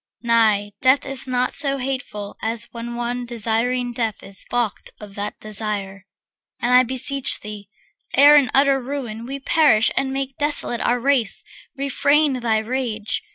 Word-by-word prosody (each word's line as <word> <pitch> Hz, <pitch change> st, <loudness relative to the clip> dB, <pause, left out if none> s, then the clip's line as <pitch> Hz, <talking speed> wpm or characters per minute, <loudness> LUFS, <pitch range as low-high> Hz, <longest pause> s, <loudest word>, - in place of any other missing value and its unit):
Nay, 215 Hz, -3 st, +2 dB
death 260 Hz, +2 st, +3 dB
is 270 Hz, -1 st, -2 dB
not 250 Hz, 0 st, 0 dB
so 275 Hz, -1 st, +2 dB
hateful 250 Hz, -6 st, -5 dB
as 225 Hz, +1 st, -2 dB
when 235 Hz, 0 st, -6 dB
one 240 Hz, +1 st, -3 dB
Desiring 240 Hz, +1 st, -2 dB
death 230 Hz, -3 st, -3 dB
is 195 Hz, -1 st, -5 dB
balked 240 Hz, -4 st, -2 dB
of 210 Hz, -2 st, -11 dB
that 205 Hz, +1 st, -5 dB
desire. 200 Hz, -2 st, -5 dB, 0.5 s
And 245 Hz, +1 st, 0 dB
I 250 Hz, -, +8 dB
beseech 260 Hz, +2 st, +1 dB
thee, 205 Hz, -1 st, -9 dB, 0.5 s
ere 290 Hz, +1 st, +8 dB
in 280 Hz, -4 st, +4 dB
utter 275 Hz, 0 st, +3 dB
ruin 240 Hz, -4 st, -6 dB
We 275 Hz, +1 st, -5 dB
perish 275 Hz, -6 st, +3 dB
and 270 Hz, 0 st, -1 dB
make 270 Hz, 0 st, -4 dB
desolate 290 Hz, -5 st, +3 dB
our 245 Hz, 0 st, +1 dB
race, 255 Hz, -4 st, 0 dB, 0.3 s
Refrain 280 Hz, 0 st, +2 dB
thy 230 Hz, -2 st, +1 dB
rage. 220 Hz, -2 st, -2 dB
245 Hz, 155 wpm, -21 LUFS, 220-270 Hz, 0.5 s, I